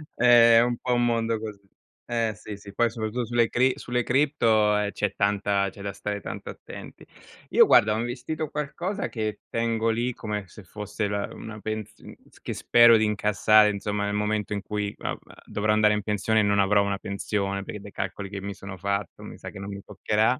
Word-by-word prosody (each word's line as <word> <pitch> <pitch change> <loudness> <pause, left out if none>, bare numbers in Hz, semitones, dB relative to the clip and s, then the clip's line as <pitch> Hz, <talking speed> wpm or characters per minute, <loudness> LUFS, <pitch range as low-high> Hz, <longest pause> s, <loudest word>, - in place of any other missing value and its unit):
È 120 -1 +7
un 120 0 0
po' 125 - -1
un 120 0 +2
mondo 115 -1 0
così. 105 -2 -8 0.4
Eh 115 -2 0
sì, 105 0 -8
sì, 100 0 -12
poi 120 +3 +2
soprattutto 115 +1 -3
sulle 120 0 +2
cri 130 +1 +3
sulle 125 0 -1
cripto, 115 -5 +2
ehm, 105 0 0
c'è 105 -2 -2
tanta 100 -1 +1
c'è 100 +1 -12
da 100 -1 -4
stare 105 +1 -4
tanto - - -7
attenti. - - -11 0.4
Io - - +6
guarda, 105 0 +5
ho 110 - -1
investito 125 +7 -3
qualcosa 170 +7 -3
che 110 -2 -4
tengo 115 -1 0
lì 120 +3 0
come 105 -3 -4
se 100 +4 -13
fosse 105 +3 -4
la 100 0 -2
una 110 -1 -9
pens 110 0 -5
uhm, - - -12 0.2
s - - -21
che - - -4
spero 120 -1 +6
di 110 - +2
incassare, 105 0 +4
insomma, 105 0 -2
nel 100 0 -2
momento 105 0 -1
in 100 -1 -3
cui, 105 -1 -3
vabbè, - - -4 0.3
dovrò 105 +1 -1
andare 105 0 +4
in 105 - -1
pensione 105 +2 +1
e - - +4
non 100 0 +2
avrò 100 +1 +4
una 100 -1 -1
pensione, 100 0 -3
perché 105 - -7
dai 100 0 -11
calcoli 95 +1 -5
che 100 0 -6
mi 100 0 -5
sono 95 -1 -8
fatto 100 -1 -3
mi - - -9
sa - - -8
che - - -10
non 100 +1 -6
mi 100 0 -7
toccherà. 105 +4 +1
105 Hz, 210 wpm, -26 LUFS, 100-115 Hz, 0.4 s, È